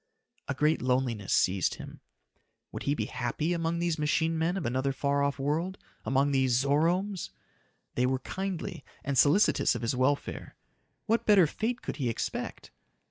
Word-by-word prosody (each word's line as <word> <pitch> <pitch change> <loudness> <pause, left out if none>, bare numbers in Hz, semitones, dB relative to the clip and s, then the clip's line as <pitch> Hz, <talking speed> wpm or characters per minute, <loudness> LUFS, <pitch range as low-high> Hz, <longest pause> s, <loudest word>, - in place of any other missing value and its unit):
A 140 - -2
great 150 +4 +2
loneliness 125 -5 0
seized 95 0 +2
him. - - -10 0.7
Would - - -6
he 145 - +2
be - - -2
happy 150 +7 -2
among 165 0 -1
these 170 -2 -1
machine 160 +2 +1
men 165 +3 0
of 185 - -3
another 130 +3 0
far 140 +1 0
off 140 0 0
world 155 +7 -1 0.3
among 135 +2 +2
these 130 -3 +3
Zoromes? 170 +7 +1 0.6
They 125 +1 +1
were 130 0 +1
kindly 190 +5 -5 0.2
and 140 -1 -2
solicitous 145 - +4
of 120 - -4
his 115 +2 0
welfare. 130 +3 -1 0.5
What 230 +1 +1
better 200 -5 +7
fate 230 +10 -3
could - - -4
he 130 -5 0
expect? 115 - -4
145 Hz, 160 wpm, -29 LUFS, 130-170 Hz, 0.7 s, better